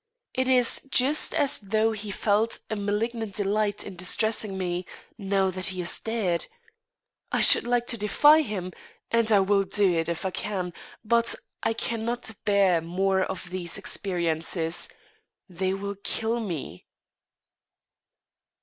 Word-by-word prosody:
It 260 0 0
is 250 -2 +4
just 275 +4 +3
as 285 0 +2
though 215 +2 +1
he 215 -1 -6
felt 210 +3 +1
a - - 0
malignant 210 +1 -2
delight 205 0 0
in 195 - -8
distressing 205 +2 0
me, 180 -1 -2 0.3
now 195 -2 0
that 185 0 -3
he 185 -1 -3
is 175 - -1
dead. 210 -7 -1 0.8
I - - +1
should - - +6
like 240 0 +1
to 235 -2 -2
defy 295 +9 +5
him, 195 - -4 0.4
and 230 -1 +3
I 205 -2 +6
will 200 +1 +3
do 195 -1 +2
it 165 0 -1
if 170 +2 -3
I 190 - 0
can, 180 -3 -3 0.3
but 235 +1 +2 0.3
I 225 - +1
cannot 230 +1 -2
bear 195 -5 +3
more 190 +3 0
of 185 -2 -4
these 180 -1 -3
experiences 170 -3 -1 0.6
they 185 0 -2
will 200 0 -5
kill 225 +2 -1
me." 170 - -6
200 Hz, 140 wpm, -26 LUFS, 185-225 Hz, 0.8 s, should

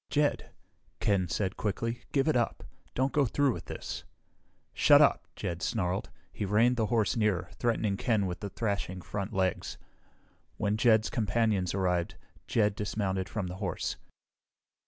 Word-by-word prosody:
"Jed," 145 0 +1 0.5
Ken 95 -3 +2
said 95 +3 -2
quickly, 115 +3 -2
"give 135 +1 +2
it 155 - +3
up! 120 -2 0 0.3
Don't 130 +2 +1
go 145 -3 +3
through 140 +2 +2
with - - -7
this!" - - -6 0.7
"Shut - - +6
up!" - - +4
Jed 85 0 -4
snarled. 95 -4 -1 0.2
He - - -4
reined 110 +5 +3
the 110 -3 +1
horse 115 -2 +1
nearer, 105 -6 +1
threatening 110 -4 +1
Ken 110 -4 +1
with 90 -1 -3
the 100 - -5
thrashing 100 -4 -3
front 100 -2 -4
legs. 95 -2 -1 0.8
When 105 -1 +1
Jed's 110 -1 +4
companions 105 -4 +1
arrived, 90 -3 0 0.3
Jed 105 -3 +2
dismounted 100 -2 -2
from 105 -4 -3
the 90 +1 -6
horse. 95 -2 -2
105 Hz, 150 wpm, -30 LUFS, 95-115 Hz, 0.8 s, Shut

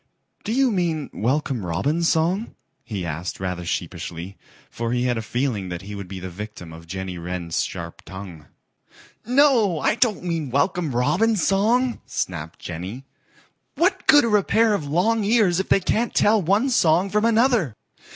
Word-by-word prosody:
"Do 215 - -3
you 260 +1 +3
mean 170 -7 -1
Welcome 130 0 -1
Robin's 145 - 0
song?" 175 +7 0 0.3
he 105 -6 -5
asked 85 +2 -4
rather 90 -2 -3
sheepishly, 85 +2 -5 0.4
for 115 0 -3
he 125 0 0
had 125 -1 +1
a - - -3
feeling 110 -4 -2
that 90 +1 -6
he 105 +1 -8
would 100 -2 -7
be 95 0 -7
the 95 - -6
victim 90 -3 -8
of 85 +1 -12
Jenny 95 0 -5
Wren's 85 -1 -2
sharp 85 -2 -7
tongue. 95 -6 -10 0.8
"No, 245 - +4
I - - +2
don't 220 -5 +1
mean 165 -5 -2
Welcome 145 +1 0
Robin's 190 - +2
song," 235 +6 +2
snapped 80 -3 -4
Jenny. 95 +10 -7 0.7
"What 360 +4 +1
good 290 -5 +7
are 215 -2 +4
a 200 - +1
pair 225 +2 +3
of 155 -8 -2
long 210 +9 +1
ears 200 -5 +3
if 190 - -3
they - - +5
can't 225 +5 -1
tell 210 0 +4
one 205 +10 +2
song 180 -3 +3
from 210 +1 +1
another? 230 - +3
150 Hz, 170 wpm, -23 LUFS, -, 0.8 s, good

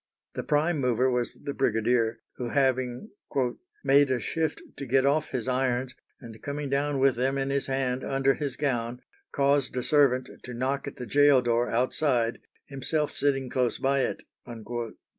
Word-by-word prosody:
The - - -3
prime 155 +2 +1
mover 125 0 +2
was 125 -1 -1
the 140 - -3
brigadier, 115 0 +1 0.2
who, 120 -1 -3
having 130 - 0 0.7
"made 140 0 +5
a 130 -1 +1
shift 160 +4 -2
to 140 - -6
get 135 +2 +3
off 150 +2 +2
his 125 -1 -3
irons, 130 0 0 0.3
and 115 -4 -11
coming 140 -1 -4
down 140 0 0
with 135 0 +4
them 130 +3 0
in 135 0 -1
his 140 0 -1
hand 130 -1 -1
under 135 0 +2
his 140 -3 -3
gown, 125 -4 -2 0.3
caused 140 -2 +1
a 125 - -1
servant 135 -4 +3
to 125 -1 -8
knock 135 +3 -2
at - - -6
the 125 - -6
gaol 140 +1 +5
door 120 0 +1
outside, 125 -1 +1 0.3
himself 145 +2 -2
sitting 135 -2 0
close 125 -1 0
by 135 +1 +1
it." 130 - -2
130 Hz, 165 wpm, -27 LUFS, 125-140 Hz, 0.7 s, made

